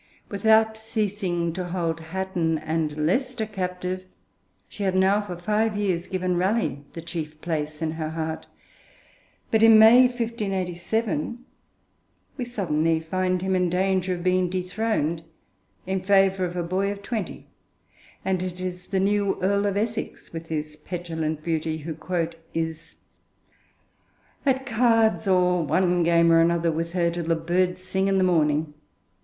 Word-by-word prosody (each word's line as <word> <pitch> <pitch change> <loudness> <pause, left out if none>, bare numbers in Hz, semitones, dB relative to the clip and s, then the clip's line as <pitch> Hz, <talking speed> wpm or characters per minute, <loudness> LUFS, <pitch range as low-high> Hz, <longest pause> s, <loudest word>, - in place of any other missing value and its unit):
Without 220 +2 +3
ceasing 200 -6 -2
to 185 +1 -3
hold 170 -2 -2
Hatton 165 -1 -1
and 155 -1 -2
Leicester 250 - 0
captive, 185 -2 -4 0.6
she 205 - -10
had 190 -2 +1
now 190 +2 +4
for 180 -4 -6
five 210 +4 0
years 185 -4 -1
given 185 -1 -1
Raleigh 185 - 0
the 165 - -7
chief 155 -3 -6
place 155 -1 -3
in 160 - 0
her 160 -1 -4
heart. 160 0 -4 1.0
But, 220 - +3
in 225 -1 +8
May 235 +4 +8
1587, 215 -3 -2 0.9
we 250 - -3
suddenly 165 -8 0
find 185 +2 -1
him 190 0 +1
in 180 -1 +2
danger 185 0 +1
of 175 - -7
being 185 0 +2
dethroned 185 -3 -1 0.6
in 190 0 -1
favour 195 -1 +3
of 175 0 -5
a 175 - -1
boy 190 +4 0
of 200 0 -8
twenty, 215 -3 -4 0.8
and 190 -2 0
it 185 -1 -5
is 180 0 -5
the 195 - 0
new 200 0 +1
Earl 200 +2 +1
of 200 0 -1
Essex, 220 -3 -3
with 165 0 -6
his 155 -1 -4
petulant 160 -2 -4
beauty, 160 -1 -1
who 160 +1 -6 0.6
'is, 160 -1 -4 1.5
at 265 0 +2
cards, 225 -3 +2
or 180 -2 +3
one 180 +3 +2
game 170 0 +4
or 165 - +6
another, 170 0 +2
with 165 +2 -3
her, 170 -2 +2
till 170 -1 -4
the 165 0 +2
birds 180 +3 0
sing 190 +1 0
in 195 0 +2
the 190 - +3
morning.' 155 -3 +2
180 Hz, 150 wpm, -25 LUFS, 165-200 Hz, 1.5 s, in